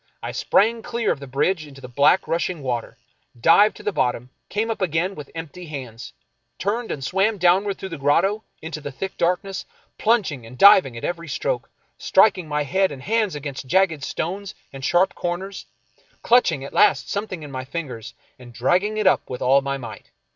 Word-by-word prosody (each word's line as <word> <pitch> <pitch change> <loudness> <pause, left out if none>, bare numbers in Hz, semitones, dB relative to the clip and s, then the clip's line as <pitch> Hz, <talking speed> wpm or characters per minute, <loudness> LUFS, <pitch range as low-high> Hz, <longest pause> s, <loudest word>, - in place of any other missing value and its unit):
I - - -3
sprang 225 +3 +2
clear 235 0 -1
of - - -2
the 140 - -9
bridge 155 +5 0
into 135 -1 -13
the 125 - -9
black 140 +8 +3
rushing 170 -2 -2
water, 120 -3 -3 0.4
dived 205 - +5
to - - -12
the 210 - 0
bottom, 125 -6 -1 0.2
came 225 +2 -1
up 225 - -5
again 180 +2 0
with 150 -6 -9
empty 165 +2 -8
hands, 130 -6 -8 0.5
turned 225 +4 -2
and 135 - -4
swam 195 +8 +1
downward 190 +3 +3
through 190 - -6
the 165 -4 -7
grotto 195 +10 +2 0.2
in 160 - -6
the 150 -3 -6
thick 190 +8 -5
darkness, 180 +3 -1 0.4
plunging 210 - +1
and 115 +3 -12
diving 190 - +7
at - - -8
every 170 -1 -3
stroke, - - -2 0.3
striking 185 -6 +3
my 150 0 -1
head 190 +6 +1
and 135 -2 -9
hands 215 -5 0
against 140 -2 -6
jagged 165 -2 +2
stones 190 +7 -4 0.2
and 135 -1 -9
sharp 175 +7 +3
corners, 185 +3 -4 0.6
clutching 185 - +3
at 140 - -8
last - - +4
something 200 -5 -4
in 145 - -9
my 130 -1 -4
fingers 130 -6 -6 0.2
and 120 -1 -13
dragging 185 - +1
it 215 - 0
up 185 - +3
with 125 - -5
all 135 +2 +5
my 140 0 -2
might. 115 -4 -10
170 Hz, 190 wpm, -22 LUFS, 135-195 Hz, 0.6 s, diving